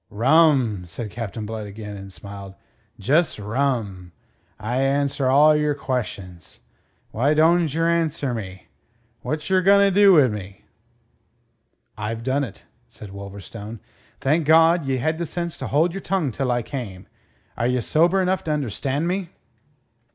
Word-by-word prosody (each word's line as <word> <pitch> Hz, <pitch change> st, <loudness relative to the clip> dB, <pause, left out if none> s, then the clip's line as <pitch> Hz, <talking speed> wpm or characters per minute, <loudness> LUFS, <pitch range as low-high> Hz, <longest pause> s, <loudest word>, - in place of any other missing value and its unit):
"Rum," 125 Hz, -, +3 dB
said 105 Hz, +5 st, -7 dB
Captain 110 Hz, -1 st, -5 dB
Blood 110 Hz, -1 st, -6 dB
again, 105 Hz, 0 st, -8 dB
and 100 Hz, -1 st, -9 dB
smiled. 100 Hz, 0 st, -10 dB, 0.4 s
"Jus' 150 Hz, -, +1 dB
rum. 105 Hz, -5 st, -2 dB, 0.5 s
I 120 Hz, +5 st, -1 dB
answer 140 Hz, 0 st, +1 dB
all 150 Hz, +3 st, +6 dB
your 150 Hz, -1 st, +1 dB
queshons. 105 Hz, -, -5 dB, 0.5 s
Why 140 Hz, +7 st, +1 dB
donjerr 165 Hz, 0 st, +3 dB
answer 160 Hz, -6 st, 0 dB
mine? 95 Hz, -5 st, -6 dB, 0.6 s
Whatcher 160 Hz, +5 st, 0 dB
gonerdo 200 Hz, +1 st, +5 dB
wi' 135 Hz, -, +5 dB
me?" 100 Hz, -3 st, -7 dB, 1.3 s
"I've 110 Hz, +2 st, -4 dB
done 135 Hz, +3 st, 0 dB
it," 105 Hz, -6 st, -9 dB, 0.2 s
said 105 Hz, -3 st, -12 dB
Wolverstone. 100 Hz, +3 st, -9 dB, 0.4 s
"Thank 150 Hz, +3 st, +1 dB
God, 165 Hz, -1 st, +5 dB
ye 135 Hz, -1 st, 0 dB
had 155 Hz, +6 st, -1 dB
the 170 Hz, -, -2 dB
sense 170 Hz, 0 st, -4 dB
to -, -, -4 dB
hold 160 Hz, +5 st, +2 dB
your 195 Hz, +3 st, -6 dB
tongue 180 Hz, -8 st, -1 dB
till 130 Hz, +3 st, -2 dB
I 120 Hz, -1 st, 0 dB
came. 110 Hz, -9 st, -7 dB, 0.5 s
Are 120 Hz, -, 0 dB
ye 125 Hz, 0 st, +1 dB
sober 170 Hz, -, +2 dB
enough 185 Hz, +1 st, 0 dB
to 155 Hz, -, -1 dB
understand 140 Hz, +2 st, -2 dB
me?" 185 Hz, -1 st, -2 dB
130 Hz, 140 wpm, -22 LUFS, 105-160 Hz, 1.3 s, all